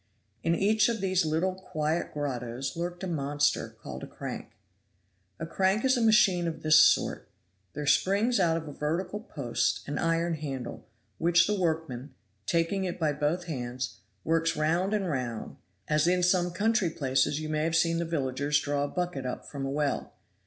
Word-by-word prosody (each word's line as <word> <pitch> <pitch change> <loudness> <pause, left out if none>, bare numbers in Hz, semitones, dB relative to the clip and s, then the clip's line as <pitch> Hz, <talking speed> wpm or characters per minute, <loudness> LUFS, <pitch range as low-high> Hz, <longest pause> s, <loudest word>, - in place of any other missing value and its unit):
In 165 +1 +1
each 215 +4 +3
of 230 -2 -1
these 185 -3 +1
little 165 +4 +1
quiet 160 -3 -2
grottoes 130 -2 -3
lurked 175 +2 -4
a - - -2
monster, 145 -3 0
called - - -7
a - - -7
crank. - - -7 0.9
A 165 - -3
crank 190 +7 +1
is 260 0 +4
a 245 - 0
machine 195 -6 +4
of 165 - -5
this 155 0 +6
sort - - +4 0.4
there 150 - -4
springs 205 - +3
out 165 -3 +3
of 160 -1 -6
a 145 - -7
vertical 170 +8 -2
post 140 - -2
an 145 +1 -2
iron 165 +1 +1
handle, 140 -5 -5 0.3
which 170 +1 +4
the 210 - 0
workman, 160 -8 -2 0.3
taking 170 +4 +1
it 180 -1 -3
by 155 -3 +1
both 150 +5 -1
hands, 125 -5 -4 0.2
works 165 0 +1
round 170 +7 +1
and 195 -3 -1
round, 125 -7 -3 0.3
as 150 +1 +2
in 180 0 +3
some 180 0 +3
country 205 +1 +1
places 140 0 +1
you 155 - -4
may 155 0 -1
have 165 +1 0
seen 165 0 +2
the - - 0
villagers 145 -2 0
draw 145 0 -1
a - - -3
bucket 175 -6 -3
up 125 - -5
from 135 -2 -5
a - - -3
well. 145 +1 -1
165 Hz, 180 wpm, -28 LUFS, 145-180 Hz, 0.9 s, this